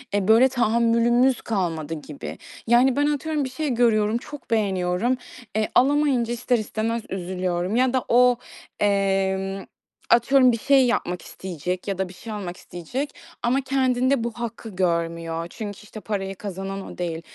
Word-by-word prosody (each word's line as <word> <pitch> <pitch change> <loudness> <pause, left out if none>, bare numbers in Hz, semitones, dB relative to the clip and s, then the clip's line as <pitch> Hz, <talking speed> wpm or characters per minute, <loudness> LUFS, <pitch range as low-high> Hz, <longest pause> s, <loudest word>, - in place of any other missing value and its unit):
e, 200 -2 0
böyle, 225 +4 +7
tahammülümüz 235 +1 +3
kalmadı 165 -7 -2
gibi. 150 -2 -7 0.3
Yani, 245 +2 +5
ben 290 - +2
atıyorum, 300 0 -1
bir 260 - -3
şey 290 +4 -3
görüyorum, 225 -2 +3
çok 285 +2 -10
beğeniyorum. 195 +2 +1 0.4
E, 215 -1 +1
alamayınca 270 -3 +3
ister 245 +1 +1
istemez 220 +1 -2
üzülüyorum 180 +1 -2
ya 255 +1 +3
da 260 - 0
o, 245 0 +5 0.4
emm, 195 -1 +1 0.5
atıyorum, 255 +2 +5
bir 230 - -1
şey 270 +2 +4
yapmak 180 -7 -1
isteyecek 180 +1 -5
ya 195 -2 -2
da 190 -1 -2
bir - - -11
şey 220 +4 -8
almak 185 -4 -5
isteyecek 250 - -5 0.3
ama 255 +3 +2
kendinde 260 -1 +1
bu 235 - -2
hakkı 230 -1 -6
görmüyor 170 -2 -1
çünkü, 205 0 -7
işte, 210 +1 -10
parayı 195 -2 -3
kazanan 195 0 -5
o - - -16
değil. 165 -2 -3
220 Hz, 150 wpm, -24 LUFS, 190-250 Hz, 0.5 s, böyle